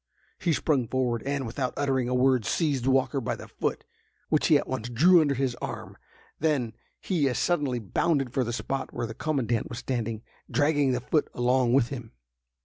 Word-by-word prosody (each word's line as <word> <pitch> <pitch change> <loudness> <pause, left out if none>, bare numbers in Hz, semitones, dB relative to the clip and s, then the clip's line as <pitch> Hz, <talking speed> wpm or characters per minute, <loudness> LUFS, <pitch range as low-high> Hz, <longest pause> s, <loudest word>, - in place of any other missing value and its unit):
He 175 - +1
sprung 145 -6 +1
forward, 125 -2 0
and, 140 -1 -1
without 125 +2 -3
uttering 135 -3 0
a 125 - 0
word, 130 -2 +3
seized 140 - 0
Walker 135 +1 +2
by 115 - -2
the - - -10
foot, - - -3 0.5
which - - +2
he - - +6
at - - -3
once 115 +2 -3
drew 170 +9 +6
under 145 -3 +1
his 130 -1 0
arm; - - -6 0.4
then 140 -8 0 0.3
he 155 -8 +1
as 125 - -2
suddenly 145 -8 +1
bounded 130 - 0
for 130 - +1
the 120 - -3
spot 135 +3 -3
where 120 - -3
the 110 - -6
commandant 120 -5 -1
was 115 - -6
standing, 115 -4 -3 0.3
dragging 145 -3 +2
the 125 - -1
foot 150 +4 0
along 125 0 +2
with 125 -3 +3
him. 120 -5 -7
130 Hz, 190 wpm, -27 LUFS, 120-145 Hz, 0.5 s, he